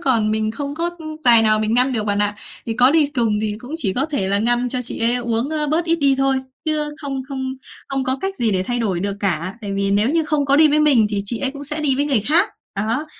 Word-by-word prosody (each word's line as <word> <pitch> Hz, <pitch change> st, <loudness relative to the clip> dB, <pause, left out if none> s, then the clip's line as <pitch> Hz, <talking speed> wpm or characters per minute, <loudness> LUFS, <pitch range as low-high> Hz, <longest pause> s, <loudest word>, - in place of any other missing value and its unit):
còn 230 Hz, -5 st, +1 dB
mình 215 Hz, 0 st, -1 dB
không 280 Hz, +5 st, -5 dB
có, 340 Hz, +2 st, -2 dB
ưm, 310 Hz, -1 st, -8 dB
tài 235 Hz, -2 st, +7 dB
nào 215 Hz, -1 st, +3 dB
mình 215 Hz, +1 st, 0 dB
ngăn 255 Hz, +2 st, +4 dB
được 215 Hz, -3 st, -2 dB
bạn 205 Hz, -1 st, -1 dB
ạ. 205 Hz, 0 st, 0 dB, 0.3 s
Thì 225 Hz, -, -2 dB
có 250 Hz, +2 st, +5 dB
đi 310 Hz, -2 st, +3 dB
cùng 225 Hz, -4 st, +1 dB
thì 210 Hz, -1 st, -2 dB
cũng 250 Hz, +7 st, -8 dB
chỉ 200 Hz, -, 0 dB
có 270 Hz, +6 st, 0 dB
thể 205 Hz, -11 st, -1 dB
là 200 Hz, -, +1 dB
ngăn 240 Hz, +3 st, +1 dB
cho 255 Hz, 0 st, -2 dB
chị 245 Hz, -, -4 dB
ấy 235 Hz, +2 st, +3 dB
uống, 235 Hz, +2 st, -2 dB
ơ, 305 Hz, -1 st, -1 dB
bớt 330 Hz, +2 st, +1 dB
ít 335 Hz, 0 st, +1 dB
đi 280 Hz, -3 st, +2 dB
thôi, 270 Hz, 0 st, +2 dB, 0.3 s
chứ 305 Hz, -1 st, -1 dB
không 270 Hz, -2 st, -4 dB
không 265 Hz, -1 st, -4 dB, 0.4 s
không 270 Hz, -1 st, -2 dB
có 260 Hz, +1 st, -1 dB
cách 385 Hz, 0 st, -3 dB
gì 230 Hz, -2 st, +1 dB
để 185 Hz, -1 st, +1 dB
thay 240 Hz, +5 st, -2 dB
đổi 195 Hz, -7 st, -1 dB
được 200 Hz, +1 st, -3 dB
cả, 185 Hz, 0 st, -1 dB
tại 200 Hz, -2 st, -5 dB
vì 195 Hz, 0 st, 0 dB
nếu 210 Hz, +6 st, +2 dB
như 325 Hz, -1 st, +1 dB
không 300 Hz, -1 st, 0 dB
có 280 Hz, 0 st, +2 dB
đi 310 Hz, 0 st, +6 dB
với 300 Hz, +1 st, +2 dB
mình 265 Hz, -8 st, +4 dB
thì 200 Hz, -1 st, -1 dB
chị 225 Hz, +3 st, -1 dB
ấy 270 Hz, -, -1 dB
cũng 280 Hz, +1 st, -9 dB
sẽ 300 Hz, +2 st, 0 dB
đi 275 Hz, -3 st, +2 dB
với 285 Hz, -, +1 dB
người 270 Hz, -7 st, +2 dB
khác, 325 Hz, -, +2 dB, 0.3 s
đó, 230 Hz, +9 st, -2 dB
250 Hz, 285 wpm, -19 LUFS, 215-290 Hz, 0.4 s, tài